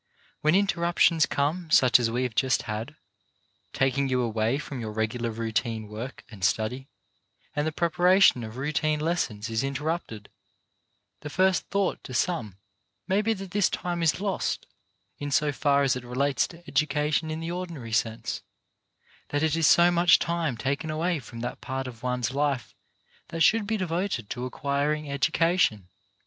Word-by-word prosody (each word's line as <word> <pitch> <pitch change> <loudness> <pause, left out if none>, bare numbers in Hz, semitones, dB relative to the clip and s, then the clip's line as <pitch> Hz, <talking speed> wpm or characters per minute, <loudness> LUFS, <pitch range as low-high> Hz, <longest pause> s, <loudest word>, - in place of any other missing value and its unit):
When 155 +3 +3
inter 195 -3 +2
ruptions 170 -2 +3
come 160 +4 -1
such 125 -4 +6
as 115 -2 +1
we 120 +3 -1
have 125 -3 -2
just 130 +4 +1
had, 110 +7 -5 0.8
taking 135 +1 +1
you 130 -1 +1
away 115 +2 0
from 145 -3 -6
your 110 -1 -4
regular 110 +2 -2
routine 110 0 -2
work 110 +6 -7
and 105 -4 -12
study, 110 +6 0 0.7
and 145 +1 0
the - - 0
preparation 175 -3 +4
of 110 +2 -8
routine 150 +2 0
lessons 150 -10 -1
is 115 +2 -1
interrupted, 140 -6 -3 0.9
the 150 - -7
first 185 +4 +2
thought 200 -2 0
to 130 - -7
some 115 - -1 0.5
may 195 +2 +2
be 225 +1 +1
that 195 -2 -8
this 205 -1 +2
time 175 -1 -3
is 160 -3 +2
lost, 195 -1 -2 0.5
in 145 - -4
so 145 +1 +2
far 140 -1 +2
as 135 -2 +2
it 125 - -5
relates 135 +3 0
to 170 0 -15
education 150 +1 0
in 155 0 -3
the 165 +1 -4
ordinary 170 -10 -6
sense; 115 0 -1 0.9
that 145 +1 0
it 160 0 +2
is 165 -2 +3
so 175 +1 +6
much 175 -1 +5
time 165 -7 -1
taken 140 +6 -2
away 165 +2 0
from 115 -2 -9
that 120 - -5
part 130 0 -4
of 120 -3 -9
one's 125 -1 -1
life 135 -7 -1 0.5
that 165 -1 -5
should 220 -2 +4
be 220 0 0
devoted 175 - -2
to 125 0 -3
acquiring 145 +3 -1
education. 140 - +1
140 Hz, 165 wpm, -27 LUFS, 120-170 Hz, 0.9 s, such